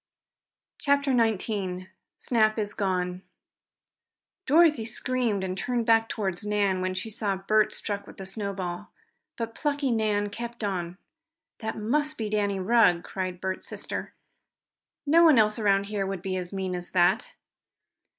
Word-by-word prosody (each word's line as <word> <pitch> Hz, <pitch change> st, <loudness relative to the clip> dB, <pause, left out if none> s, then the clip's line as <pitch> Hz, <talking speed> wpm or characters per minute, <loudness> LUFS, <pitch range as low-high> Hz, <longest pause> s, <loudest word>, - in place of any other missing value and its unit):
CHAPTER 280 Hz, -2 st, +2 dB
XIX 205 Hz, -5 st, 0 dB, 0.3 s
SNAP 215 Hz, -2 st, +2 dB
IS 205 Hz, -1 st, -2 dB
GONE 180 Hz, -3 st, -1 dB, 1.3 s
Dorothy 305 Hz, -4 st, +5 dB
screamed, 230 Hz, -3 st, -1 dB
and 185 Hz, -1 st, -2 dB
turned 240 Hz, +3 st, -1 dB
back 225 Hz, -1 st, +4 dB
toward 190 Hz, -4 st, -2 dB
Nan 205 Hz, -3 st, +1 dB
when 185 Hz, 0 st, -1 dB
she 205 Hz, +4 st, -4 dB
saw 205 Hz, -3 st, -1 dB
Bert 215 Hz, +3 st, +2 dB
struck 205 Hz, -1 st, -3 dB
with -, -, -13 dB
the 190 Hz, -, -7 dB
snowball. 195 Hz, -1 st, -4 dB, 0.5 s
But 230 Hz, -2 st, -4 dB
plucky 285 Hz, -2 st, -1 dB
Nan 210 Hz, -2 st, +1 dB
kept 235 Hz, +1 st, -6 dB
on. 180 Hz, -3 st, -3 dB, 0.6 s
"That 220 Hz, 0 st, -4 dB
must 295 Hz, +8 st, 0 dB
be 215 Hz, -2 st, -3 dB
Danny 205 Hz, -2 st, 0 dB
Rugg!" 185 Hz, -4 st, +4 dB
cried 185 Hz, -2 st, -4 dB
Bert's 190 Hz, 0 st, -3 dB
sister. -, -, -4 dB, 0.9 s
"No 325 Hz, +4 st, +5 dB
one 315 Hz, -6 st, +7 dB
else 215 Hz, 0 st, +3 dB
around 200 Hz, -2 st, +3 dB
here 200 Hz, -1 st, -2 dB
would 190 Hz, -2 st, -4 dB
be 190 Hz, -2 st, -2 dB
as 180 Hz, -1 st, -4 dB
mean 190 Hz, -2 st, -3 dB
as 175 Hz, 0 st, -5 dB
that!" 175 Hz, -2 st, +2 dB
205 Hz, 145 wpm, -27 LUFS, 190-230 Hz, 1.3 s, one